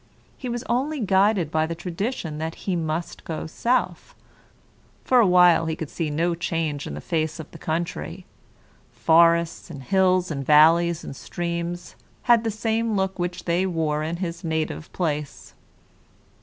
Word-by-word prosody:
He 255 - -6
was 240 0 -3
only 275 +6 -1
guided 195 - +2
by 155 0 +1
the 165 - -4
tradition 175 -1 -4
that 160 +1 -4
he 190 - 0
must 165 0 -3
go 160 - -5
south. 240 +10 -1 0.9
For 255 - +4
a 225 - +5
while 180 -2 +5
he 160 - -1
could 160 -2 -6
see 165 -3 -2
no 165 +4 0
change 165 -4 -2
in 70 - -5
the 75 - -7
face 160 -1 -2
of 160 - -9
the - - -12
country. 160 - -4 0.7
Forests, 170 +1 +3
and 140 -5 -8
hills, 185 +2 +2
and 140 -2 -3
valleys, 165 +3 +5
and - - -7
streams 170 +2 -4 0.3
had 235 -2 +4
the 225 - 0
same 225 +1 -1
looks 190 -1 -1
which 180 +1 -3
they 175 +2 +1
wore 160 -4 -1
in 160 +2 -3
his 170 -1 -5
native 160 - -3
place. 150 -5 -3
170 Hz, 160 wpm, -24 LUFS, 160-190 Hz, 0.9 s, a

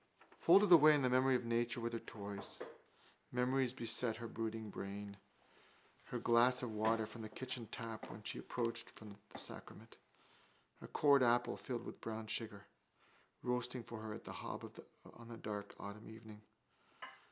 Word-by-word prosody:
Folded 195 +3 +7
away 155 -2 +10
in 145 - +2
the 125 - +3
memory 130 +1 +5
of 125 - 0
nature 120 +1 +1
with 115 0 -2
her 115 - -1
toys. 100 -2 -5 0.7
Memories 125 +1 +2
beset 115 -2 0
his 115 0 -6
brooding 110 -1 -3
brain. 100 +1 -5 0.9
Her - - -3
glass 125 +2 +4
of 120 - -2
water 110 +1 +2
from 110 +2 -9
the 110 - -6
kitchen 125 0 -4
tap 115 -1 -6
when 105 - -9
she - - -3
had - - -9
approached 115 -1 -2
the 105 -2 -12
sacrament. - - -8 0.8
A - - -7
cored 140 -2 +5
apple, 120 0 +4
filled 120 -2 -4
with - - -8
brown 110 0 -4
sugar, 105 -2 -3 0.8
roasting 125 0 -1
for 115 -1 -7
her 110 0 -5
at - - -9
the - - -7
hob - - -6 0.5
on 115 0 -11
a 115 - -7
dark 105 -2 -5
autumn 100 +2 -7
evening. 110 -1 -11
115 Hz, 165 wpm, -38 LUFS, 110-125 Hz, 0.9 s, away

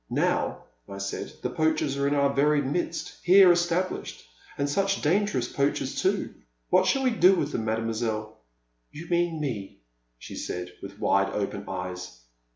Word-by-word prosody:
Now, - - 0 0.3
I 100 - -7
said, 100 0 -4
the - - -1
poachers 155 -3 +1
are 140 0 0
in 145 - +1
our 140 -1 +2
very 150 +2 +3
midst 145 +5 -3
— - - -27
here 185 +1 +8
established 175 +1 -1 0.2
— - - -22
and 140 - 0
such 195 +6 +1
dangerous 155 - +1
poachers, 140 +2 -1
too! - - 0 0.4
What - - +4
shall 270 - +2
we 255 - +3
do 195 -4 +5
with 150 -4 -1
them, 110 - -2
Mademoiselle? 110 -1 -2 0.3
*' - - -47
You 160 +3 -9
mean 170 -2 +1
me," 105 - -5 0.3
she - - -10
said, 90 0 -5
with 100 +1 -9
wide 95 0 +2
open 100 0 -3
eyes. 90 -5 -6
140 Hz, 170 wpm, -27 LUFS, -, 0.4 s, here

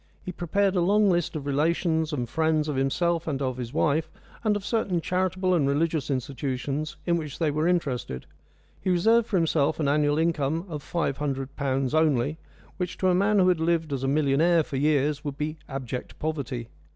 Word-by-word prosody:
He 180 - -3
prepared 190 +3 0
a 180 - +3
long 200 +3 +4
list 175 -2 0
of 145 -3 -4
relations 160 +2 +1
and 125 -5 -2
friends 160 +2 +1
of 150 - -2
himself 165 +5 0
and 140 -4 -1
of 130 -2 -2
his 120 -2 -5
wife, 155 +1 +1 0.3
and 215 -2 +2
of 200 -1 -4
certain 200 -6 0
charitable 185 +1 0
and 155 -6 +2
religious 155 0 0
institutions 140 +2 -3
in 170 -1 +2
which 150 -3 -5
they 160 -3 +1
were 155 +3 0
interested. 130 - -1 0.6
He - - -1
reserved 220 +6 +3
for 200 - +1
himself 160 -3 +1
an 150 - +1
annual 145 +1 +2
income 160 0 0
of 150 -4 -5
five 150 -3 -2
hundred 135 -2 -3
pounds 135 -2 -1
only, 155 -1 +2 0.4
which 180 -1 -3
to 185 - +2
a - - +4
man 200 +3 +3
who 185 -1 +5
had 180 -3 +2
lived 160 -2 0
as 135 - -2
a - - +1
millionaire 155 +4 +3
for 140 - -5
years 145 0 +1
would 145 -2 -4
be 155 +2 -3
abject 130 -2 -5
poverty. 140 -7 -3
155 Hz, 195 wpm, -26 LUFS, 140-175 Hz, 0.6 s, who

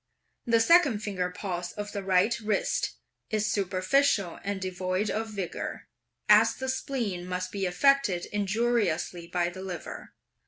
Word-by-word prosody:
The 230 -1 +4
second 270 -5 +5
finger 185 -4 -2
pulse 180 -1 -4
of 205 0 -5
the 200 - -4
right 190 +4 +3
wrist 210 -2 -1 0.3
is 215 -1 0
superficial 195 +1 +1
and 200 -1 -2
devoid 185 +2 -2
of 220 +1 -2
vigour, 195 -5 -5 0.4
as - - +6
the 260 0 -4
spleen 240 -9 -2
must 185 0 -3
be 195 -2 -1
affected 200 -1 +3
injuriously 205 -5 0
by 175 0 0
the 185 +2 -9
liver. 185 -3 -7
195 Hz, 140 wpm, -28 LUFS, 180-225 Hz, 0.4 s, as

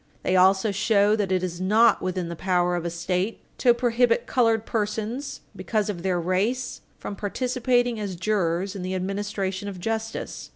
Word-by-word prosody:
They 185 - +1
also 190 +3 +4
show 205 +1 +3
that 205 -3 -1
it 185 -1 +1
is 175 -1 -4
not 220 +5 +4
within 185 -1 -2
the 170 - -5
power 180 0 +1
of 175 -1 -3
a - - 0
State 180 +5 -2 0.2
to 245 - +5
prohibit 240 0 +2
colored 225 -3 +2
citizens, 220 +5 -3
because 215 -2 -1
of 175 -4 -7
their 180 -1 0
race, 200 +9 -1 0.2
from 200 - -6
participating 245 +2 0
as 200 -3 -4
jurors 190 0 0
in 195 - -5
the 185 +1 -3
administration 195 +1 -3
of 195 -3 -6
justice. 225 +3 -4
200 Hz, 170 wpm, -25 LUFS, 185-225 Hz, 0.2 s, to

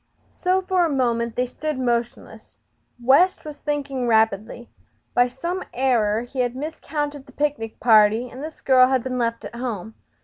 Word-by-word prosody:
So 375 +1 +2
for 370 -1 +2
a 335 - +1
moment 235 -4 0
they 250 - +1
stood 305 +3 -4
motionless. 240 -2 -3 0.4
West 280 +11 +3
was 300 -1 -8
thinking 280 -4 -3
rapidly. 220 +1 +1 0.5
By 245 0 +4
some 340 +9 -4
error 235 -4 +1
be 265 - -4
had 245 -1 0
miscounted 295 -1 -4
the - - -14
picnic 285 -7 -2
party 220 +1 +5
and 255 +3 -9
this 315 0 -8
girl 255 -1 +5
had 260 -2 +1
been 255 -1 -3
left 230 -1 -2
at - - -8
home. 225 -4 -5
255 Hz, 165 wpm, -23 LUFS, 235-290 Hz, 0.5 s, party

